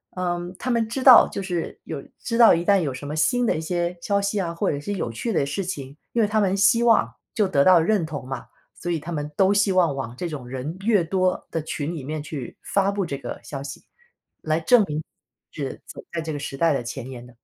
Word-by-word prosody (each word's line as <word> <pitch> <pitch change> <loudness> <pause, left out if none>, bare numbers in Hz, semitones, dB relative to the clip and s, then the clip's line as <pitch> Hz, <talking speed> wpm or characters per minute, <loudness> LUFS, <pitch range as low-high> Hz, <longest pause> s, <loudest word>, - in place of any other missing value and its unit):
嗯， 175 0 -2
他 255 - -3
们 230 -2 +1
知 260 +4 -4
道 255 -3 +9
就 200 - -4
是 175 -3 -4
有 150 -4 -5 0.2
知 230 -1 -2
道 235 -2 +8
一 170 +1 +1
旦 200 +1 +4
有 140 -5 -2
什 140 +2 -7
么 150 - -4
新 245 +10 +2
的 - - +2
一 - - -3
些 175 +1 -2
消 200 +1 +1
息 200 +1 -1
啊， 170 -3 -2
或 170 - 0
者 145 - -3
是 205 +8 -4
有 120 -11 -3
趣 225 - -3
的 140 - +2
事 145 +8 -3
情， 140 -5 -6 0.2
因 235 - +2
为 210 - +3
他 215 +1 +1
们 195 -1 +2
希 210 +4 +4
望 230 -2 +4 0.2
就 210 -3 +2
得 140 -6 +3
到 185 -2 +7
认 180 0 +2
同 145 -4 -6
嘛， 135 -2 -5 0.3
所 175 - -4
以 165 - 0
他 170 +4 -7
们 150 -2 -3
都 195 +1 +4
希 200 -1 +3
望 170 -6 +3
往 125 -3 -5
这 175 +5 -4
种 135 -5 -7
人 135 +7 -5
越 210 -6 +4
多 185 +1 0
的 165 - -1
群 155 +1 -3
里 140 - -6
面 155 +2 -4
去 145 -4 -7
发 200 0 +1
布 200 -2 -1
这 140 -4 -4
个 - - -7
消 140 -2 -6
息 140 - -8 0.6
来 155 +1 0
证 220 +6 +5
明 150 +1 -3 0.5
是 140 -3 -5
走 - - -10
在 165 - -2
这 160 0 -4
个 145 - -4
时 140 -1 -5
代 165 -1 +3
的 125 - -1
前 125 +1 -6
沿 125 -2 -9
的。 125 -1 -17
170 Hz, 275 characters per minute, -24 LUFS, 145-200 Hz, 0.6 s, 道